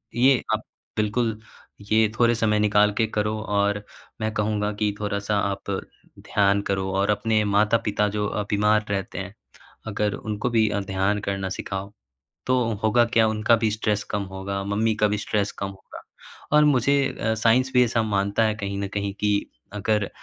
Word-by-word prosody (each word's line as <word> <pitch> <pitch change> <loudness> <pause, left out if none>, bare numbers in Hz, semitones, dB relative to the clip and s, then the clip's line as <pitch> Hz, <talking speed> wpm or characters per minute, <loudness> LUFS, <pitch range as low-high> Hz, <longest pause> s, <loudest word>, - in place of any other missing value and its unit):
ये 130 +1 +4
आप - - -6 0.3
बिल्कुल 110 +1 0 0.5
ये 110 0 +4
थोड़े 120 0 +4
समय 110 -2 +1
निकाल 105 0 +4
के 115 - +2
करो 105 0 -1
और 105 -1 0 0.4
मैं 110 0 -1
कहूँगा 105 -1 0
कि 105 -1 +1
थोड़ा-सा 105 0 -1
आप 100 0 -3 0.5
ध्यान 100 0 +2
करो। 95 0 -1
और 100 +2 +1
अपने 105 +1 +1
माता-पिता 105 +1 +2
जो 105 0 0
अ, 105 - -2
बीमार 105 +1 +3
रहते 95 -2 -3
हैं। 100 +2 -7 0.5
अगर 105 -1 -1
उनको 110 +3 -3
भी 110 -2 +3
अ, 100 - -1
ध्यान 95 +1 0
करना 95 -1 -3
सिखाओ 95 +1 -5 0.5
तो 130 - +2 0.3
होगा 110 +2 +4
क्या? 115 -1 +3
उनका 110 +2 +3
भी 110 -1 +1
स्ट्रेस 105 -1 -1
कम 105 -1 -1
होगा। 100 +1 -4
मम्मी 110 +3 +1
का - - +7
भी 105 - 0
स्ट्रेस 105 -1 -1
कम 100 - -2
होगा, 95 -1 -12 0.5
और 150 0 +6
मुझे 140 -1 +3 0.3
अ, 110 0 +1
साइंस 120 +4 +2
भी 125 - +6
ऐसा 115 -1 0
मानता 100 0 +1
है। 110 -1 +1
कहीं 100 -2 -4
न 100 - -2
कहीं 100 -1 -2
कि 105 - +2 0.4
अगर 105 0 0
105 Hz, 175 wpm, -24 LUFS, 100-110 Hz, 0.5 s, का